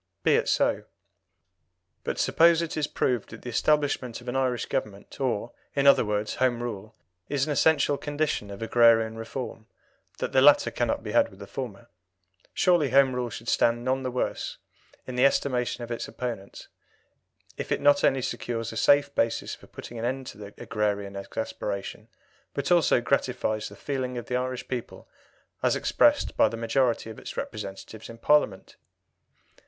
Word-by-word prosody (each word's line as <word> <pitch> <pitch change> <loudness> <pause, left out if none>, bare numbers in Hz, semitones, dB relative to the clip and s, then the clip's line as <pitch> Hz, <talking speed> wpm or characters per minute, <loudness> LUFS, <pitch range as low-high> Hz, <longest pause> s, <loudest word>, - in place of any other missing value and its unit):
Be - - +4
it - - +2
so. - - +1 1.2
But - - -3
suppose 170 0 +4
it 165 - -5
to 155 - -2
be 150 - -1
proved 125 -4 0
that 115 - -11
the 125 - -5
establishment 140 -3 +1
of 120 - -15
an 125 - -3
Irish 130 -3 0
Government, 100 +6 -5
or, 120 -3 -1 0.2
in 140 -1 +1
other 140 - +7
words, 105 0 -2
Home 120 -2 +1
Rule, 110 -2 -6 0.3
is 140 -2 +1
an 155 - -3
essential 145 -1 +3
condition 145 -8 -2
of 100 +2 -7
agrarian 115 -1 +4
reform 115 0 -6 0.5
that - - -3
the 130 - +4
latter 145 +1 +6
cannot - - -1
be - - -5
had - - +3
without - - -16
the - - -9
former - - -6 0.6
surely 175 -6 +3
Home 135 0 +5
Rule 125 -1 -2
should 115 +1 -9
stand 120 +1 +2
none 130 +1 +1
the 130 - -2
worse 125 0 -3 0.5
in 125 -1 -6
the 125 - +3
estimation 125 -3 +1
of 120 - -7
its 120 - -3
opponents 115 -6 -6 0.9
if - - -6
it - - +1
not 145 0 +4
only 130 -1 +3
secures 115 -2 -3
a 110 - -7
safe 145 +4 +4
basis 115 -3 0
for - - -12
putting 120 - -9
an 115 - -2
end 130 +2 -2
to 105 -3 -9
agrarian 100 -2 -2
exasperation, 105 0 -5 0.5
but 140 +2 -2
also 170 -7 +4
gratifies 125 -4 -1
the - - -12
feeling 130 -3 -3
of 120 - -5
the 125 - -3
Irish 125 0 -3
people 125 -3 -6 0.5
as - - +2
expressed - - +2
by - - +4
the 115 - -6
majority 115 -1 0
of 110 - -10
its - - -9
representatives 100 +1 -6
in 115 - -10
Parliament? 115 -7 +1
125 Hz, 175 wpm, -27 LUFS, 110-135 Hz, 1.2 s, other